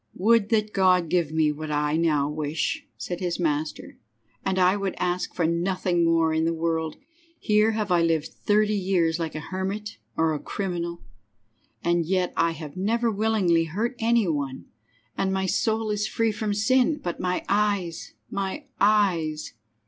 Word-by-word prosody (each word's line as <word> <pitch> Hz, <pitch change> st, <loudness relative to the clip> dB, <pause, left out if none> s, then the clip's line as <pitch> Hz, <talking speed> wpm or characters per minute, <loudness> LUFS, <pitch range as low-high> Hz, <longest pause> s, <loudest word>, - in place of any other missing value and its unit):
"Would 215 Hz, +2 st, +3 dB
that 215 Hz, -2 st, +1 dB
God 185 Hz, -2 st, +4 dB
would 165 Hz, -, -10 dB
give 170 Hz, -4 st, +1 dB
me 155 Hz, -1 st, +2 dB
what 155 Hz, +1 st, -6 dB
I 150 Hz, 0 st, 0 dB
now 155 Hz, -4 st, +2 dB
wish," 155 Hz, -, -2 dB
said 175 Hz, -1 st, -5 dB
his 180 Hz, -2 st, -2 dB
master, 155 Hz, -2 st, -2 dB, 0.4 s
"and 190 Hz, -1 st, -1 dB
I 185 Hz, +1 st, +4 dB
would 195 Hz, -2 st, -2 dB
ask 180 Hz, 0 st, -2 dB
for 170 Hz, -, +1 dB
nothing 175 Hz, +1 st, +1 dB
more 165 Hz, -1 st, +3 dB
in 160 Hz, 0 st, +1 dB
the 165 Hz, 0 st, +1 dB
world. 160 Hz, -1 st, -1 dB, 0.4 s
Here 215 Hz, +1 st, +3 dB
have 215 Hz, -3 st, -2 dB
I 175 Hz, -1 st, +4 dB
lived 165 Hz, -2 st, +1 dB
thirty 210 Hz, 0 st, +2 dB
years 180 Hz, -4 st, +1 dB
like 160 Hz, -2 st, -3 dB
a -, -, -2 dB
hermit 195 Hz, +5 st, -4 dB, 0.2 s
or 160 Hz, -1 st, +2 dB
a 150 Hz, -, -2 dB
criminal, 170 Hz, -2 st, -4 dB, 0.8 s
and 170 Hz, 0 st, +2 dB
yet 185 Hz, -1 st, 0 dB
I 170 Hz, -, +2 dB
have 155 Hz, -2 st, -9 dB
never 230 Hz, +5 st, +1 dB
willingly 200 Hz, -6 st, +2 dB
hurt 215 Hz, +10 st, -2 dB
any 230 Hz, -2 st, +3 dB
one, 140 Hz, -4 st, -3 dB, 0.5 s
and 190 Hz, -, 0 dB
my 190 Hz, 0 st, 0 dB
soul 220 Hz, +3 st, 0 dB
is 210 Hz, +1 st, 0 dB
free 225 Hz, -1 st, +1 dB
from 210 Hz, -1 st, -2 dB
sin, 255 Hz, +8 st, +3 dB
but 175 Hz, -, -3 dB
my 180 Hz, 0 st, -1 dB
eyes, 200 Hz, -5 st, 0 dB, 0.2 s
my 200 Hz, +9 st, -3 dB
eyes!" 185 Hz, -7 st, +2 dB
180 Hz, 170 wpm, -25 LUFS, 165-210 Hz, 0.8 s, God